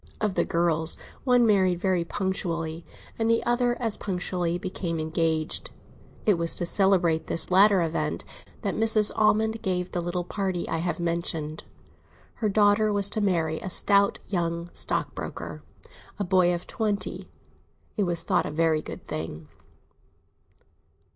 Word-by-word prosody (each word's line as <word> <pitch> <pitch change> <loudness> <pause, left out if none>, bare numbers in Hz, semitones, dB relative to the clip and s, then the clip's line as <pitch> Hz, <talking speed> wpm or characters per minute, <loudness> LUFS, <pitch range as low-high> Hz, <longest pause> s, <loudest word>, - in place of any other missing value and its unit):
Of 210 -3 0
the - - +1
girls, 165 -1 +2 0.3
one 245 -2 +4
married 190 -5 +3
very 185 -2 +1
punctually, 170 -3 -3 0.4
and 225 0 +1
the 230 - +2
other 240 0 +1
as 225 -4 -1
punctually 180 -2 -2
became 180 -3 -4
engaged. 160 0 -1 0.6
It 205 -6 +3
was 170 0 +1
to 175 - -1
celebrate 175 -4 +2
this 165 - +2
latter 195 0 +6
event 85 - -2 0.4
that - - -1
Mrs. 220 -1 +4
Almond 220 +1 +2
gave 180 -3 -2
the 175 - -2
little 175 +1 -2
party 185 -1 -3
I - - -1
have 170 0 -2
mentioned. 165 -2 -2 0.8
Her 215 - +2
daughter 210 +1 +3
was 200 -1 +1
to 215 - 0
marry 165 -5 0
a 190 - -5
stout 200 +2 +3
young 170 -2 -2
stockbroker, - - -4 0.6
a 205 - -1
boy 180 -1 +3
of 175 0 -3
twenty; 210 -3 -2 0.7
it 205 - +1
was 175 -2 +1
thought - - +1
a - - -5
very 160 0 +1
good - - -9
thing. 80 -1 -6
180 Hz, 145 wpm, -26 LUFS, 165-205 Hz, 0.8 s, latter